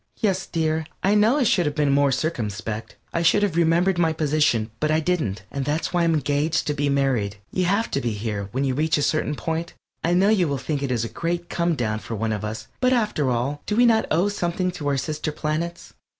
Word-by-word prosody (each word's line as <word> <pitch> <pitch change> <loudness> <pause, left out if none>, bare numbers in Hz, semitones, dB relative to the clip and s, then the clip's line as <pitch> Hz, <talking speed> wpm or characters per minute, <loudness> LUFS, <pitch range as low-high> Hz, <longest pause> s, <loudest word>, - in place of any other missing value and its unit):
_) - - -46 0.2
Yes, 190 -4 0
dear, 160 -1 -1 0.2
I 195 - +3
know 215 +6 +4
I 285 - +3
should 185 -8 +2
have 150 - -2
been 150 -2 +2
more 140 0 +3
circumspect. 110 -7 -3 0.2
I 165 - 0
should 170 +5 +4
have 195 -6 0
remembered 170 +2 +3
my 165 -2 +3
position, 150 -8 +1
but 155 - 0
I 155 +1 +3
didn't. 155 - -1
And 140 - -2
that's 150 +6 -2
why 175 -1 +2
I'm 165 -1 +3
engaged 145 +2 0
to 150 - 0
be 145 0 0
married. 130 -8 +1 0.2
You 185 - 0
have 200 +5 +1
to 140 - 0
here, 105 -3 -3
when 130 +3 -1
you 135 -2 +1
reach 155 +4 +1
a 145 - 0
certain 150 -1 0
point 165 +6 -3 0.3
I 170 +2 +2
know 195 +3 +4
you 195 -6 +3
will 140 -1 -1
think 140 +2 -3
it 140 - -2
a 115 -2 0
great 170 +5 -3
come 170 -1 +1
down 110 -5 -1
for 115 - -6
one 110 +1 -1
of 105 -1 -4
us, 110 +1 -5
but 255 0 +3
after 210 - +1
all 130 +4 -1
do 210 - 0
we 245 +2 +5
not 225 -2 +3
owe 170 +5 +2
something 180 -2 -1
to 165 -5 -5
our 140 -1 +1
sister 155 +3 -2
planets? 160 +3 -3
155 Hz, 235 wpm, -23 LUFS, 135-175 Hz, 0.3 s, we